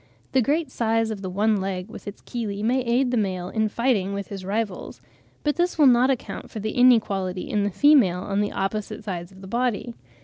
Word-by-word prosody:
The 260 - +3
great 295 +3 0
size 225 -1 0
of 205 -3 -5
the 190 - -4
one 210 +3 +2
leg 190 -1 -3
with - - -11
its 205 - -8
chelae 210 -4 -4
may 250 +4 +2
aid 245 +1 +1
the 245 - +1
male 185 -4 -1
in 220 -1 0
fighting 220 -5 0
with 200 0 -5
his 195 -2 -6
rivals; 200 0 -3 0.4
but 295 -1 0
this 350 0 0
will 300 - +6
not 250 0 +5
account 260 -3 -3
for 220 - -6
their 215 +1 -2
inequality 200 -7 +2
in 205 -1 0
the - - +1
female 200 -5 +4
on 200 +1 -1
the 205 - -1
opposite 210 +2 -3
sides 175 -3 -5
of 190 0 -15
the 190 - -9
body. 240 +1 -1
215 Hz, 215 wpm, -24 LUFS, 195-245 Hz, 0.4 s, will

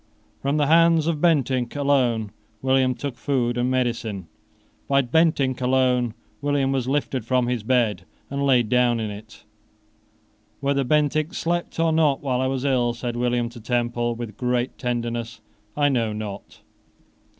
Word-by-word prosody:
From 140 +2 0
the 150 - +2
hands 165 +1 +4
of 160 -3 -1
Bentinck 135 -7 +1
alone 125 -7 +1 0.3
William 130 -1 +2
took 140 -2 -5
food 125 -4 0
and 125 +1 0
medicine. 115 -7 -2 0.6
By 140 0 +3
Bentinck 135 -2 +1
alone 125 -2 +2 0.3
William 145 -2 +1
was 130 -2 -1
lifted 135 -2 -1
from 125 +2 +1
his 125 -1 -1
bed 110 -5 +1 0.3
and 140 0 -3
laid 125 -4 +3
down 120 0 +2
in 110 -2 -3
it. 105 +2 -12 1.2
"Whether 140 0 +1
Bentinck 150 +3 +1
slept 175 0 -2
or 165 0 +3
not 155 -4 +3
while 130 -3 -1
I 130 - +1
was 135 0 -2
ill," 120 -3 +1
said 120 0 -4
William 120 0 0
to 120 0 -12
Temple, 120 0 -1
with 115 -3 -7
great 125 0 -1
tenderness, 120 -2 -3 0.4
"I 145 -1 +3
know 115 -6 0
not. 105 -2 -7
125 Hz, 150 wpm, -23 LUFS, 120-140 Hz, 1.2 s, hands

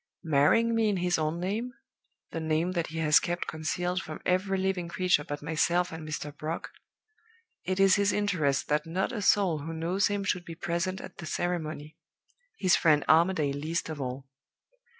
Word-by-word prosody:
Marrying 160 +10 +3
me 225 -1 +2
in 200 - 0
his 175 -2 +1
own 155 +2 -1
name 220 +8 -3 0.6
the 165 - -3
name 160 +2 0
that 170 -3 -1
he 160 - -7
has 155 -2 +5
kept 175 0 -3
concealed 175 +4 -2
from 155 -4 -7
every 190 +2 +1
living 190 -2 -1
creature 175 -3 +1
but 145 0 -6
myself 170 +3 +1
and 160 -1 -7
Mr. 150 -1 -5
Brock 155 +3 -5 0.9
it 185 0 -1
is 195 0 +6
his 200 0 +3
interest 170 -10 0
that 150 +2 0
not 185 +8 -1
a 230 -5 -4
soul 190 -5 +3
who 160 +3 -6
knows 175 +5 +1
him 205 -1 -2
should 180 -2 -1
be 165 -1 -8
present 170 +3 -2
at - - -10
the 170 - -7
ceremony; 155 -3 -3 0.6
his 185 - +4
friend 150 -3 +3
Armadale 160 -3 +3
least 155 +4 -3
of 155 -3 -5
all. 130 +1 -5
170 Hz, 180 wpm, -28 LUFS, 155-185 Hz, 0.9 s, is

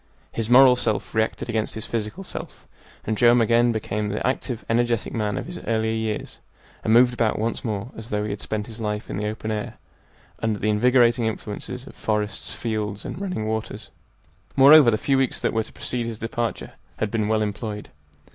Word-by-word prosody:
His 115 -1 -3
moral 125 0 +8
self 115 -3 -1
reacted 110 +2 0
against 110 -2 -1
his 110 0 -3
physical 115 - -4
self, - - -8 0.4
and 110 - 0
Joam 120 +3 +5
again 120 +1 +4
became 105 -1 -2
the 105 - -2
active, 125 -2 -2
energetic 120 -1 0
man 105 -3 -1
of - - -4
his 175 +1 -7
earlier 110 -1 +1
years, 110 -1 -3 0.4
and 110 - +1
moved 120 +2 +6
about 115 -3 +1
once 115 +2 -2
more 110 +1 -3
as 110 +1 -8
though 105 0 -1
he 105 - -3
had 100 - -5
spent 105 -1 -3
his 115 0 -9
life 105 -1 -3
in - - -3
the 105 +1 -2
open 110 +1 -4
air, 105 -1 -4 0.7
under 110 -2 0
the 105 +2 -1
invigorating 120 +1 +4
influences 110 +3 -5
of - - -12
forests, 105 -1 -2
fields, 105 -3 -3
and - - -6
running 180 - -3
waters. 110 0 -4 0.6
Moreover, 140 0 +8
the 110 - +2
few 135 +4 +1
weeks 135 -2 0
that - - 0
were 110 - +2
to - - -14
precede 120 -2 -3
his 115 -2 -5
departure 115 -1 -3 0.3
had 105 - -2
been 110 -2 0
well 110 0 +2
employed. 105 0 -4
110 Hz, 195 wpm, -24 LUFS, 105-120 Hz, 0.7 s, moral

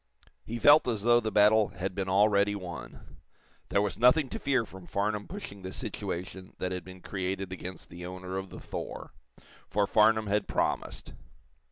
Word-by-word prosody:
He 115 - -5
felt 145 +4 +6
as 110 -4 -1
though 120 +1 +5
the 110 -2 -3
battle 105 0 +5
had 95 0 -5
been 95 0 -2
already 100 +1 +3
won. 90 -8 -9 0.5
There 100 - +2
was 105 - -3
nothing 125 +4 +5
to - - -5
fear 130 -4 +1
from 95 -3 -12
Farnum 105 +1 -1
pushing 170 - -8
the 95 0 -6
situation 95 +1 -5
that 90 - -3
had 90 -2 -3
been 95 0 -12
created 95 0 -3
against 95 0 -8
the 85 +1 -9
owner 90 +1 -5
of 95 0 -7
the - - -9
"Thor," - - -7 0.6
for 100 0 +2
Farnum 110 +2 +4
had 105 +1 0
promised. - - -2
100 Hz, 175 wpm, -29 LUFS, 95-110 Hz, 0.6 s, felt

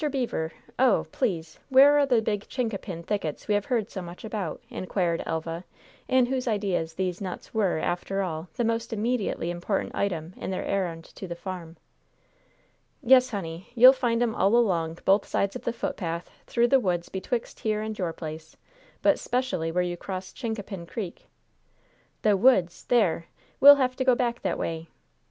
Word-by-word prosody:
Beever! 240 - -2 0.3
Oh! 255 -5 +4
please, 165 -10 -2
where 280 +2 +7
are 285 - +3
the 240 -4 +3
big 210 -2 -2
chincapin 200 -8 -3
thickets 180 -6 -3
we 210 - +2
have 205 -1 +1
heard 230 -4 -1
so 190 - -5
much 175 +4 -9
about?" 210 -6 -4
inquired 180 -2 -1
Elva, 165 +1 -3 0.4
in 260 -1 +4
whose 255 0 -2
ideas 195 -7 -1
these 185 0 -2
nuts 185 -2 -6
were, 205 -7 +1
after 180 +4 -1
all, 165 -1 -4
the 240 - 0
most 230 0 -1
immediately 215 -6 -1
important 175 +3 -2
item 175 -4 -2
in - - -5
their 190 - -3
errand 175 -4 -2
to 190 - -9
the 170 - -5
farm. 170 -2 -7 1.3
"Yes, 255 0 +6
honey, 175 -5 -6
you'll 255 +2 +9
find 240 -3 +1
'em 230 -2 0
all 205 0 +3
along 170 -8 +2
both 195 +2 +4
sides 200 0 0
of - - -7
the - - +1
footpath 170 -7 -4 0.2
through 240 0 +2
the 270 - +5
woods 175 -6 -1
betwixt 230 +5 -3
here 215 -1 -1
and 220 0 -4
your 175 -3 -1
place, 160 0 -8 0.5
but - - +4
'specially 245 -10 -1
where 180 +2 +1
you 175 0 -3
cross 185 0 -6
Chincapin 205 -7 -5
Creek." 190 -2 -6 1.0
"The 210 -2 +4
woods! 190 -5 +3
There! 185 -9 +2 0.3
We'll 285 +1 +11
have 255 -2 0
to 260 - 0
go 255 -1 +4
back 240 -1 -1
that - - -1
way. 165 0 -3
195 Hz, 175 wpm, -27 LUFS, 170-235 Hz, 1.3 s, We'll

